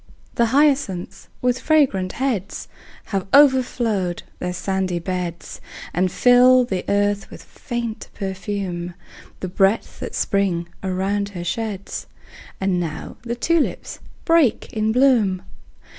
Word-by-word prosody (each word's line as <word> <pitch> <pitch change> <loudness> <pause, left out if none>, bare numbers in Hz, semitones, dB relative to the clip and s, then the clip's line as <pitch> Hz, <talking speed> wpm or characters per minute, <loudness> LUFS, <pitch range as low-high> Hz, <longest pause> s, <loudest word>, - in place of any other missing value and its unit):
The 235 - +2
hyacinths, 270 -8 +1 0.2
with 250 0 +2
fragrant 260 -13 +2
heads, 240 -8 -2 0.5
Have 195 -1 -1
overflowed 240 -10 +3 0.2
their 180 - -2
sandy 190 0 -1
beds, 175 -1 -4 0.3
And 185 0 +1
fill 250 +2 +6
the 190 -6 -3
earth 205 0 +1
with - - -11
faint 235 -3 -5
perfume, 190 -2 -4 0.5
The 185 - -2
breath 195 +4 +1
that - - -6
Spring 185 -4 0
around 195 +2 -1
her 175 - -4
sheds. 200 +1 -4 0.5
And 190 -2 +1
now 165 -3 -5
the 235 0 -4
tulips 325 +5 0 0.3
break 330 -8 +3
in 215 0 +1
bloom! 225 -7 +3
200 Hz, 115 wpm, -21 LUFS, 185-245 Hz, 0.5 s, fill